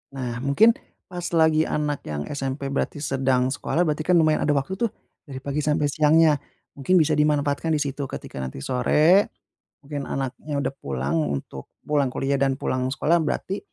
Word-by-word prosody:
Nah 120 -3 -4
mungkin, 140 - +5 0.4
pas 180 -1 -7
lagi 160 -1 +4
anak 150 -1 -2
yang 75 -1 -3
SMP 140 0 -3
berarti 140 - -2
sedang 130 -2 +1
sekolah, 160 +4 0
berarti 150 +1 -1
kan 180 - +4
lumayan 155 -1 +3
ada 150 - +2
waktu 140 +7 -1
tuh, 235 -3 0 0.4
dari 135 -2 -7
pagi 140 +1 -2
sampai 150 0 +1
siangnya, 155 +1 +4 0.4
mungkin 140 +6 +1
bisa 155 -1 +2
dimanfaatkan 150 +1 +1
di - - 0
situ. 140 0 -3
Ketika 70 - -8
nanti 65 0 -5
sore, 155 +10 +4 0.6
mungkin 145 0 -5
anaknya 140 +2 -3
udah - - -2
pulang 70 +3 -2
untuk 70 -2 -5 0.2
pulang 145 -2 +1
kuliah 135 +1 -1
dan 135 -1 +2
pulang 130 0 -1
sekolah, 165 +5 +2
berarti, 190 +5 -2
145 Hz, 170 wpm, -24 LUFS, 130-155 Hz, 0.6 s, mungkin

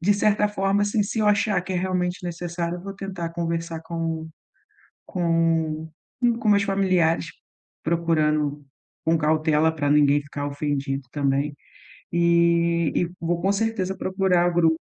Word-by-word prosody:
de 200 +5 +3
certa 210 +1 +2
forma, 200 0 +1
assim, 205 +1 +1
se 220 +2 -2
eu 210 - +2
achar 205 -2 +2
que 185 - -5
é - - 0
realmente 180 0 -1
necessário, 170 0 -3
eu 175 - -11
vou 195 - -6
tentar 190 -3 -5
conversar 165 -1 -3
com 165 -1 -4 0.8
com 165 -2 0 0.5
com 220 - -1
meus 200 -1 +5
familiares, 185 -5 +1 0.6
procurando 155 -3 0 0.4
com 165 0 +2
cautela 155 0 +2
para 145 -2 -1
ninguém 145 0 +4
ficar 145 0 -5
ofendido 140 -1 -2
também 140 0 0 0.6
e 170 -1 +3
e 175 - +1
vou 170 +1 -1
com 195 +2 +2
certeza 200 -3 -1
procurar 185 -2 +2
o - - -4
grupo. 165 -2 +3
170 Hz, 145 wpm, -24 LUFS, 160-190 Hz, 0.8 s, meus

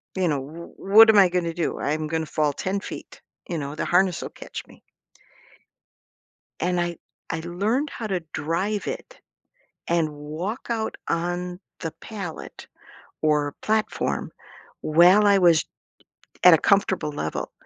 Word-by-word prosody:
you 185 -2 +1
know, 145 -3 0
wha 160 +5 -9 0.3
what 225 0 +11
am 215 - +6
I 190 -3 +7
gonna 170 -2 -1
do? 170 -1 -2
I'm 155 +1 -1
gonna 160 0 -1
fall 150 -2 0
10 195 +5 -2
feet. - - -9 0.3
You 170 - -2
know, 145 0 -4
the - - -2
harness 180 0 +2
will - - -5
catch - - -8
me. - - -18 1.8
And 180 +1 0
I 175 -1 -2 0.3
I 165 - -2
learned 205 - -1
how 225 - -6
to 190 -3 -1
drive 170 +7 -2
it - - -6 0.7
and 160 -3 0
walk 160 - -5
out 225 -2 -2
on 175 +1 -2 0.2
the 165 -3 -4
pallet 195 -7 -8 0.6
or 150 -2 +2
platform 220 0 -1 0.5
while 180 +6 +6
I 200 -1 +5
was 170 -3 +5 0.8
at 180 -2 +9
a - - +5
comfortable 195 -6 +2
level. 80 - -4
175 Hz, 145 wpm, -24 LUFS, 155-195 Hz, 1.8 s, what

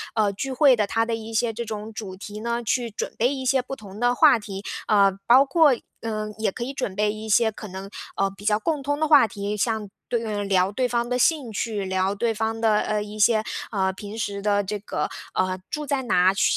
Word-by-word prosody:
呃， 210 -3 +2
聚 265 +7 -4
会 265 -1 +5
的 210 -2 +1
它 225 +2 +1
的 230 - -2
一 225 0 -5
些 225 +1 +1
这 235 +2 -5
种 215 0 -6
主 210 -4 -7
题 205 +2 -8
呢， 235 +1 -2
去 235 +1 0
准 210 - -4
备 250 +5 +2
一 265 -1 -5
些 265 0 +3
不 255 +2 -7
同 205 -4 -11
的 245 +1 +2
话 240 - +6
题。 200 -2 -7 0.2
啊， 200 -2 +4 0.2
包 255 +3 +8
括， 295 0 +4 0.3
嗯， 215 -1 -4
也 220 -3 -1
可 - - -4
以 265 +3 -4
准 230 -8 -3
备 210 +1 +1
一 215 +1 -7
些 220 +1 +3
可 215 - -9
能， 190 +1 -8 0.3
呃， 195 0 +1
比 195 +1 -13
较 210 -1 +3
共 295 +5 -1
通 290 +1 -1
的 310 - +2
话 290 -7 +7
题， 205 +1 -4
像 220 -1 -1 0.2
对 235 -1 0
嗯， 205 -2 -3
聊 190 -1 +2
对 250 +4 0
方 240 0 -1
的 250 - +1
兴 280 -4 +2
趣， 210 -1 -2
聊 190 +1 0
对 230 +2 0
方 225 +1 -2
的， 220 -2 +4
呃， 215 -1 -1
一 210 +1 -9
些， 215 +1 +4 0.3
呃， 190 -3 +1
平 205 +3 -8
时 200 -2 -3
的 205 0 +2
这 205 +2 -4
个， 205 - -3 0.2
呃， 185 0 0
住 300 0 -3
在 280 -2 -1
哪， 185 -5 +3
喜 195 - 0
215 Hz, 255 characters per minute, -24 LUFS, 205-240 Hz, 0.3 s, 包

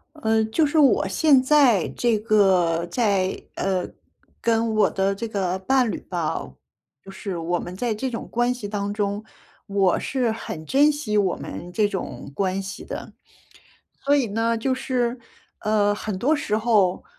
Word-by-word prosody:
呃， 220 -6 +1
就 265 +9 +1
是 295 +2 -1
我 270 -9 +4
现 270 +7 +4
在 260 - +4
这 235 -3 +1
个 185 -6 +3
在， 195 -4 0
呃， 190 -2 -1 0.5
跟 225 -1 +1
我 215 - +4
的 195 +1 0
这 205 - -4
个 190 -4 -1
伴 245 +5 +2
侣 - - -3
吧， 170 - -3 0.5
不 - - -14
是 195 -1 -5
我 170 +1 -1
们 180 - -7
在 235 0 -1
这 260 +5 -2
种 230 - -5
关 240 +1 +1
系 245 -5 -6
当 205 0 -3
中， 205 0 -2 0.4
我 195 -3 +2
是 255 -3 -1
很 170 -7 -6
珍 285 - +4
惜 260 -8 -2
我 195 -3 +2
们 175 - -8
这 210 +3 +2
种 200 -2 -6
关 190 +1 0
系 195 +1 -7
的。 - - -7 0.9
所 285 +1 +4
以 280 -3 +2
呢 225 +2 0
就 260 +4 0
是， 250 -1 -1 0.4
呃， 210 -1 +2
很 210 -1 -4
多 275 +11 +2
时 215 -8 -1
候 215 -5 +2
215 Hz, 180 characters per minute, -23 LUFS, 195-240 Hz, 0.9 s, 我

